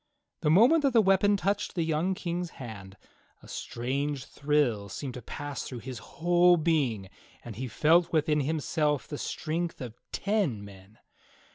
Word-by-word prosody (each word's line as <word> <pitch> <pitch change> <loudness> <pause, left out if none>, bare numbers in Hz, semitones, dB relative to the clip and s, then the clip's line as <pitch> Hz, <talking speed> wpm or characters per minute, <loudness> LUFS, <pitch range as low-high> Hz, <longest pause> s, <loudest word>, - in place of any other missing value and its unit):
The 155 - 0
moment 235 - +6
that 275 -3 +2
the 235 - +6
weapon 200 +1 +4
touched 200 +1 -1
the 170 - +1
young 160 +4 0
King's 175 0 -3
hand, 100 -6 -9 0.5
a - - -13
strange 135 +3 -3
thrill 140 -9 0
seemed 130 +5 -5
to 125 - -7
pass 145 +4 -6
through 125 -3 -7
his 130 -4 -6
whole 175 +6 +3
being 145 - 0 0.4
and 115 -3 -7
he 130 +4 -4
felt 165 +7 +3
within 155 -1 +2
himself 150 0 0
the 145 - -6
strength 165 +2 -3
of 125 -5 -6 0.2
ten 195 - -1
men. 100 +2 -15
150 Hz, 155 wpm, -28 LUFS, 125-175 Hz, 0.5 s, moment